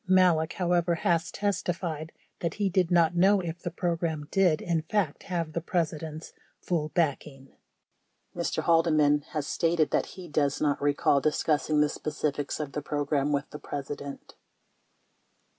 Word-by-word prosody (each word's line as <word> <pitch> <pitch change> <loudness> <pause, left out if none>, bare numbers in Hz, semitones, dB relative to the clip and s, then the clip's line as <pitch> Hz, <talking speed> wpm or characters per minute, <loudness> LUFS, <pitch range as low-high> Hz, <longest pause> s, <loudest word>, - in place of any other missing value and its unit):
Malek, 180 -4 +4
however, 175 -1 +1
has 170 -2 +1
testified 175 -5 -2 0.3
that 170 -2 -2
he 205 -2 0
did 185 -2 +2
not 170 -1 +3
know 195 +3 +5
if 170 -2 -5
the 175 - -4
program 165 -3 -2
did, 180 -6 +3
in 170 -2 0
fact, 160 -1 -1
have 170 -4 -3
the 170 - -2
President's 160 -3 -3 0.3
"full 160 -4 -1
back 155 -4 0
ing." 135 -2 -15 0.8
24 - - -4
Mr. - - -1
Haldeman 155 -3 +4
has 150 -3 -1
stated 165 -1 +1
that - - +1
he 180 -2 -8
does 145 -2 0
not 145 -2 +1
recall 145 -1 +2
discussing 150 +1 +1
the 150 - +4
specifics 150 -1 -3
of 150 -2 -4
the 150 - -3
program 145 -1 -1
with 140 +1 0
the 150 - -7
President. 140 0 -6
160 Hz, 155 wpm, -28 LUFS, 150-175 Hz, 0.8 s, know